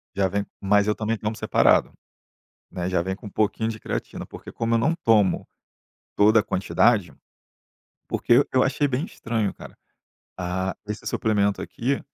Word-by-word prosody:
já 95 Hz, -1 st, +2 dB
vem 100 Hz, +2 st, -2 dB
mas 100 Hz, +1 st, +3 dB
eu 105 Hz, -, +2 dB
também 110 Hz, +1 st, -1 dB
tomo 110 Hz, +1 st, -3 dB
separado, -, -, +3 dB, 0.8 s
né, 90 Hz, 0 st, -3 dB
já 90 Hz, -2 st, +1 dB
vem 95 Hz, +1 st, -3 dB
com 105 Hz, -, -12 dB
um -, -, -7 dB
pouquinho 110 Hz, +2 st, 0 dB
de 110 Hz, -1 st, -5 dB
creatina, -, -, -5 dB
porque -, -, -11 dB
como 115 Hz, 0 st, -1 dB
eu -, -, +4 dB
não 160 Hz, +9 st, +2 dB
tomo 105 Hz, -5 st, +3 dB, 0.7 s
toda 110 Hz, +2 st, +5 dB
a -, -, -3 dB
quantidade, 100 Hz, 0 st, +1 dB, 0.9 s
porque 120 Hz, +4 st, +4 dB
eu 130 Hz, -, +3 dB
achei 140 Hz, +2 st, +1 dB
bem 135 Hz, +5 st, -1 dB
estranho, 115 Hz, -, -2 dB
cara, -, -, -13 dB, 0.6 s
ah, 95 Hz, +1 st, -2 dB
esse 105 Hz, 0 st, -6 dB
suplemento 100 Hz, -2 st, +1 dB
aqui, 135 Hz, +4 st, -2 dB
105 Hz, 165 wpm, -24 LUFS, 100-115 Hz, 0.9 s, toda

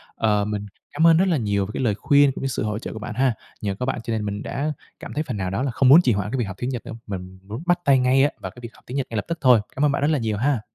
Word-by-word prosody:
Ờ, 105 Hz, -2 st, +1 dB
mình 105 Hz, -1 st, -3 dB, 0.3 s
cảm 160 Hz, +3 st, +4 dB
ơn 165 Hz, -1 st, +6 dB
rất 190 Hz, +3 st, +3 dB
là 170 Hz, -5 st, +2 dB
nhiều 100 Hz, -4 st, 0 dB
về -, -, -10 dB
cái -, -, -2 dB
lời 110 Hz, -5 st, +1 dB
khuyên 140 Hz, +5 st, +4 dB
cũng -, -, -7 dB
như 135 Hz, -, -1 dB
sự 130 Hz, -, -2 dB
hỗ 105 Hz, 0 st, -2 dB
trợ -, -, -6 dB
của 110 Hz, -, -7 dB
bạn 110 Hz, +1 st, -6 dB
ha. 130 Hz, 0 st, +2 dB, 0.3 s
Nhờ 100 Hz, -2 st, -2 dB
có 125 Hz, -, -3 dB
bạn 130 Hz, -, -2 dB
cho 115 Hz, -, -3 dB
nên 110 Hz, -2 st, -2 dB
mình 100 Hz, 0 st, -4 dB
đã 150 Hz, +2 st, -2 dB, 0.3 s
cảm -, -, -8 dB
thấy 150 Hz, -, -1 dB
phần 125 Hz, -8 st, -5 dB
nào 95 Hz, -1 st, -2 dB
đó 100 Hz, +7 st, -2 dB
là 135 Hz, -, -1 dB
không 125 Hz, +2 st, +3 dB
muốn 155 Hz, +6 st, +9 dB
trì 125 Hz, -9 st, +2 dB
hoãn 100 Hz, +1 st, -2 dB
cái 135 Hz, -, -1 dB
việc 120 Hz, -, 0 dB
học 95 Hz, -2 st, -7 dB
tiếng 125 Hz, -, -2 dB
Nhật 125 Hz, -3 st, -5 dB
nữa, -, -, -7 dB
mình 95 Hz, -2 st, -7 dB
muốn 110 Hz, +9 st, -7 dB
bắt 175 Hz, 0 st, +2 dB
tay 135 Hz, -3 st, +5 dB
ngay 130 Hz, +2 st, +4 dB
á 145 Hz, -, +4 dB
vào -, -, -5 dB
cái -, -, -15 dB
việc 115 Hz, -, -7 dB
học -, -, -21 dB
tiếng 130 Hz, -, -4 dB
Nhật 135 Hz, -, -1 dB
ngay 115 Hz, -, -6 dB
lập 105 Hz, -, -2 dB
tức 170 Hz, 0 st, -3 dB
thôi. 125 Hz, -4 st, +6 dB, 0.2 s
Cám 145 Hz, -, +2 dB
ơn 145 Hz, -, +3 dB
bạn 140 Hz, -, -1 dB
rất 145 Hz, -, +2 dB
là 150 Hz, -, +1 dB
nhiều 110 Hz, -3 st, -1 dB
ha. 130 Hz, 0 st, +1 dB
125 Hz, 365 wpm, -23 LUFS, 105-140 Hz, 0.3 s, muốn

